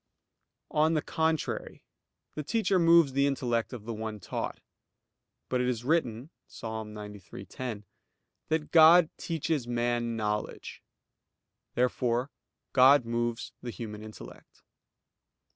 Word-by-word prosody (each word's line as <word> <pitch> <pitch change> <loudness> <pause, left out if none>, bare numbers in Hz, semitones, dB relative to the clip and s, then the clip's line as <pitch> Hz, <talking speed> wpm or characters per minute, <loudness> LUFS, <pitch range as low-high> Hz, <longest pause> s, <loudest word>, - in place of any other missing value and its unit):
On 155 +2 +3
the 155 - 0
contrary, 160 -1 -2 0.5
The 150 - -4
teacher 200 +3 +1
moves 165 -4 +5
the 140 +1 +3
intellect 120 -4 -1
of 120 -5 -8
the 115 - -4
one 110 -1 -5
taught. 90 - -4 0.9
But 125 -1 0
it 125 - 0
is 120 -2 -1
written 130 -2 0 0.2
(Ps. - - -13
93:10) 105 0 -7 0.6
that 155 -1 -1
God 165 0 +7
"teaches 160 -5 -2
man 120 -1 -1
knowledge." 105 -1 -3 0.9
Therefore 125 +1 0 0.4
God 135 0 +6
moves 120 0 -2
the 125 - -6
human 110 -2 -7
intellect. 110 0 -12
125 Hz, 110 wpm, -29 LUFS, 110-150 Hz, 0.9 s, God